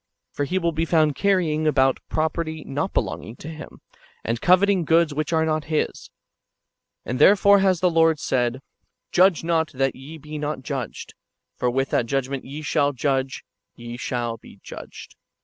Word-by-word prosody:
For 145 - -2
he 180 +6 -1
will 170 -2 +1
be 160 +1 -1
found 155 -3 +3
carrying 170 -6 +1
about 135 -3 +3
property 160 0 -2
not 145 +7 -2
belonging 110 - -3
to 150 - -9
him, 160 -1 -10 0.4
and 115 +1 -2
coveting 185 +1 +4
goods 165 0 +3
which 155 +3 -2
are 160 -1 +2
not 155 -1 -1
his. 155 -1 -2 1.0
And 125 - -3
therefore 200 0 +6
has 190 -3 +2
the 180 - +4
Lord 165 -1 +4
said: 120 -4 0
'^ 130 - -10 0.5
Judge 180 -3 +4
not, 165 -1 0
that 135 0 0
ye 145 +5 -10
be 150 0 -8
not 150 -2 -4
judged: 135 -6 -5 0.4
for 125 - 0
with 135 +2 -1
what 115 - +1
judg 135 0 -1
ment 135 -1 -5
ye 145 +3 -7
shall 145 -2 +1
judge, 135 0 -1 0.3
ye 120 0 -8
shall 120 -1 -3
be 100 - -16
judged." - - -11
155 Hz, 175 wpm, -23 LUFS, 135-165 Hz, 1.0 s, therefore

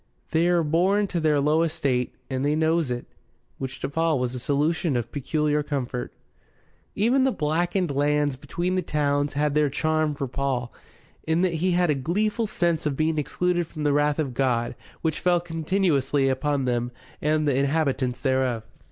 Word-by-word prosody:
They're 170 +1 +3
born 185 +7 +2
to 175 - -1
their 155 -2 +2
low 150 +3 +3
estate, 135 -6 0
and 130 0 -2
they 145 +1 +2
knows 160 -1 +1
it." 125 0 -3 0.5
Which 130 0 -5
to - - -1
Paul 160 +1 +1
was 125 -1 -1
a 125 - -4
solution 145 +2 0
of 120 -1 -4
peculiar 150 +2 0
comfort. 130 -4 -3 0.8
Even 245 +6 +3
the 265 - +3
blackened 175 - 0
lands 145 0 +1
between 175 +7 -3
the 185 - +1
towns 145 -3 0
had 145 0 +1
their 150 -1 +3
charm 155 +1 0
for 140 -1 -3
Paul, 130 -2 -2 0.5
in 160 +2 +2
that 180 -2 +2
he 175 +3 +1
had 175 -2 +3
a - - +3
gleeful 210 - 0
sense 170 -5 0
of 140 -3 -2
being 155 0 +1
excluded 175 +3 0
from 155 -2 -6
the 145 -1 +2
wrath 145 0 +2
of 145 -5 -2
God, 120 -2 0 0.3
which 160 -2 0
fell 175 -1 +3
continuously 160 -5 +1
upon 135 +1 0
them 120 -1 -1 0.3
and 155 0 +1
the 140 - +2
inhabitants 135 -3 0
thereof. 130 -4 +1
150 Hz, 175 wpm, -25 LUFS, 135-165 Hz, 0.8 s, They're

